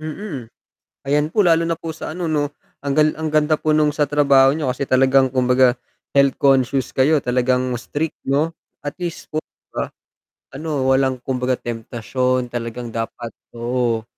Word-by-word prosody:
Mm, 155 - -6 0.6
ayan 145 +1 +2
po, 205 +1 +3
lalo 165 -1 +4
na 165 0 -1
po 160 -1 -6
sa - - -6
ano 175 +2 -4
'no, 150 -2 0 0.3
ang 140 -1 -1
gal 155 0 +4
ang 160 0 -3
ganda 155 0 +3
po 155 0 -1
nung 150 -1 +3
sa 150 -2 +1
trabaho 140 -2 +5
niyo 150 +1 -2
kasi 125 - -5
talagang 130 0 +4
kumbaga, 125 0 +3 0.3
health 140 -1 +4
conscious 135 -1 +3
kayo, 145 +2 +3
talagang 125 +1 +1
strict 150 +5 -4
'no, 145 +4 +2 0.3
at 145 0 -5
least 175 -2 -5
po, 155 - -2
'di - - -11
ba? - - -2 0.7
Ano 145 -2 -2
walang 130 -1 +2
kumbaga 125 0 0
temptasyon 125 +2 -2
talagang 120 0 -5
dapat 115 +1 -5 0.2
oo. 120 -1 -1
135 Hz, 165 wpm, -20 LUFS, 125-155 Hz, 0.7 s, trabaho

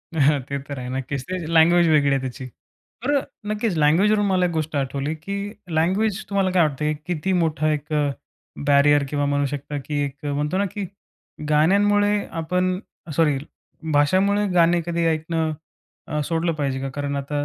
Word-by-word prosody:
हां, 145 -1 +3
ते 140 - -2
तर 140 -2 -5
आहे, 125 0 -6
नक्कीच. 130 +1 -3
ते 185 - -2 0.2
लँग्वेज 170 +1 +5
वेगळी 150 -3 +4
आहे 135 - +2
त्याची. 130 0 -6 0.6
तर 275 - +1 0.4
नक्कीच 215 -3 -1
लँग्वेजवरून 195 +8 +3
मला 185 -2 +2
एक 175 - 0
गोष्ट 160 -1 -2
आठवली 140 +2 -1
की 170 +6 -6 0.3
लँग्वेज 190 +6 +1
तुम्हाला 195 -2 +1
काय 180 -2 +4
वाटतं? 150 +1 -2 0.2
किती 180 +2 -1
मोठा 155 -2 +1
एक 150 +1 -3 0.7
बॅरियर 145 0 +5
किंवा 145 0 0
म्हणू 145 0 +1
शकता 145 +1 -4
की 150 -1 -2
एक 140 +1 -9
म्हणतो 145 +4 -1
ना, 200 - +2
की 205 0 -4 0.6
गाण्यांमुळे 205 +7 +3 0.2
आपण 180 +2 0 0.4
सॉरी, 150 -4 +3 0.6
भाषामुळे 190 +8 +3
गाणे 170 0 +4
कधी 170 -1 -1
ऐकणं 160 -1 -4
सोडलं 165 0 0
अ, - - -8
पाहिजे 140 -3 -2
का? 135 - -3
कारण 140 +1 -3
आता 145 +1 -2
155 Hz, 160 wpm, -23 LUFS, 145-180 Hz, 0.7 s, लँग्वेज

